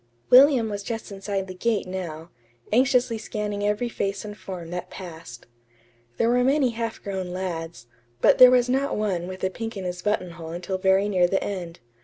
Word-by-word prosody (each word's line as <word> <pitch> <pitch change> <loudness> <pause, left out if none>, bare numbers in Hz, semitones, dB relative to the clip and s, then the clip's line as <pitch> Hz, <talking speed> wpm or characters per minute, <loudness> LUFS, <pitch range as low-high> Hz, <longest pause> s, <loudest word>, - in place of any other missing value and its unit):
William 255 -2 +7
was 205 -1 -4
just 225 +1 -5
inside 195 0 -3
the 185 - -8
gate 220 +3 0
now, 175 -3 -6 0.4
anxiously 250 -2 +3
scanning 210 -1 -4
every 210 +4 0
face 200 -3 -3
and 210 0 -7
form 180 -5 -8
that 180 0 -5
passed. 165 -10 -10 0.7
There 230 - +2
were 245 +1 +3
many 270 -1 +3
half 230 -1 -4
grown 190 -2 -3
lads, 170 -8 -5 0.3
but - - +4
there 255 0 +11
was 250 -1 +4
not 270 +3 0
one 190 -5 -1
with 185 0 -8
a 190 - +1
pink 225 +1 -6
in 195 - -5
his 180 0 -4
buttonhole 180 -5 -2
until 185 +2 -4
very 190 +1 +3
near 185 -3 +3
the 195 +2 0
end. 175 -6 -5
195 Hz, 185 wpm, -25 LUFS, 180-230 Hz, 0.7 s, there